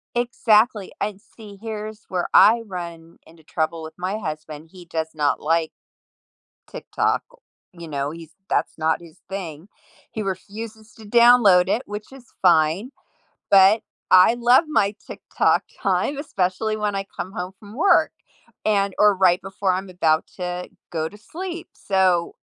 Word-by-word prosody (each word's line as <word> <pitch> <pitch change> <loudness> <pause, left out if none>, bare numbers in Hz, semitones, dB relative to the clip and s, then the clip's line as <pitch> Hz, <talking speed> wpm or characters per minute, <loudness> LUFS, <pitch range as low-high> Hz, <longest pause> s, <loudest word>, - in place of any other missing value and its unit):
Exactly, 230 -3 +2
I'd 205 -2 -2
see, 210 -3 -14
here's 215 0 -7
where 180 -2 -2
I 230 +2 +7
run 170 -3 -8
into 160 0 -19
trouble 160 +1 -2
with 160 0 -8
my 190 +4 -3
husband. 155 -3 -7
He 180 -2 -13
does 160 -1 -3
not 145 -2 0
like 160 +1 +1 1.0
TikTok. - - -1 0.5
You 170 -2 -10
know, 140 -1 -3
he's 165 -1 -11 0.2
that's - - -1
not 160 +1 0
his 165 -2 -16
thing. 180 -2 -7 0.4
He 220 - -4
refuses 215 +3 -7
to 220 - -14
download 215 -5 +6
it, 235 +6 0
which 210 +3 -8
is 265 -2 -14 0.2
fine, 175 - +3 0.6
but 195 +3 +6 0.3
I 185 +5 +7
love 245 +6 +4
my 205 -9 +1
TikTok - - 0 0.2
time, 285 - 0
especially 215 - -1
when 210 -1 -1
I 195 0 -3
come 185 - -4
home 185 -2 -5
from 205 +1 -13
work, 345 +5 +4 0.5
and 200 -2 +1
or 210 -1 +5
right 185 -1 +3
before 195 0 -1
I'm 190 +1 -3
about 160 -3 +1
to 180 -1 -4 0.2
go 160 -1 -2
to 205 - -14
sleep. 345 - -7
So, 185 -3 +1
195 Hz, 150 wpm, -22 LUFS, 170-215 Hz, 1.0 s, I